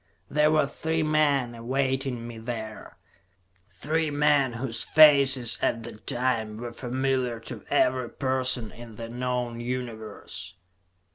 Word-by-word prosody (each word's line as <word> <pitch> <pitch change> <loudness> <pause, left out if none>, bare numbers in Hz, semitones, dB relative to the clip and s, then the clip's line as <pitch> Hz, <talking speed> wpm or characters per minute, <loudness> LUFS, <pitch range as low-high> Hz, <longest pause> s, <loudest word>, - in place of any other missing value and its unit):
There 150 +1 +3
were 155 -2 +3
three 160 +3 -2
men 145 -5 +2
awaiting 130 0 -2
me 115 -1 -8
there; 110 -2 -7 0.7
three 155 - -1
men 145 -3 +2
whose 115 0 0
faces, 140 -6 +6
at 115 - 0
that 110 -2 -11
time, 115 -4 -1
were 120 +1 -6
familiar 130 -1 -1
to - - -8
every 125 -1 +2
person 130 -4 -1
in 120 -2 -12
the 115 +1 -7
known 125 -1 -3
Universe. 120 -3 -6
125 Hz, 125 wpm, -26 LUFS, 115-140 Hz, 0.7 s, faces